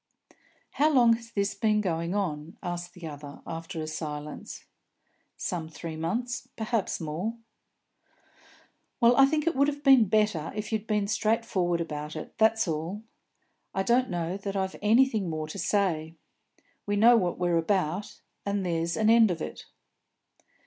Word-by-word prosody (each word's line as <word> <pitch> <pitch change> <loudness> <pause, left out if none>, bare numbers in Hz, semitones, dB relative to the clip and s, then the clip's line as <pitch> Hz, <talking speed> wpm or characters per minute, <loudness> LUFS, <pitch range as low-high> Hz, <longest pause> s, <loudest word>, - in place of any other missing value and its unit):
"How 300 +2 +3
long 240 -5 +6
has 230 0 -5
this 200 -2 -1
been 210 +1 +1
going 170 -2 -1
on?" 170 -1 -3
asked 175 -1 -5
the 175 -2 -9
other, 145 -2 -9
after 165 0 -6
a - - -3
silence. 150 -1 -6 0.7
"Some 165 -3 -3
three 160 0 -7
months 240 +10 -3
perhaps 220 -2 -1
more." 170 +8 -3 1.6
"Well, 240 0 +6
I 270 +1 +7
think 305 +1 0
it 335 - +1
would 280 +1 +4
have 290 0 -3
been 265 -5 +7
better 210 -6 +1
if 210 +1 -4
you'd 220 0 -2
been 210 -2 +1
straightforward 215 -5 0
about 150 -1 -5
it, 155 - -7
that's 220 -1 +4
all. 165 +7 -3 0.7
I 190 - +1
don't 245 +4 +2
know 175 0 -2
that 200 0 -5
I've 190 -1 -1
anything 220 -3 +3
more 155 -1 -3
to 175 +6 -7
say. 165 -7 0 0.7
We 205 - +1
know 230 +4 +7
what 180 -6 +1
we're 175 -2 +2
about, 190 +3 -1 0.2
and 200 -1 -1
there's 170 -1 -1
an 220 - +2
end 225 -2 +6
of 170 -2 -2
it." - - -6
195 Hz, 155 wpm, -28 LUFS, 165-225 Hz, 1.6 s, I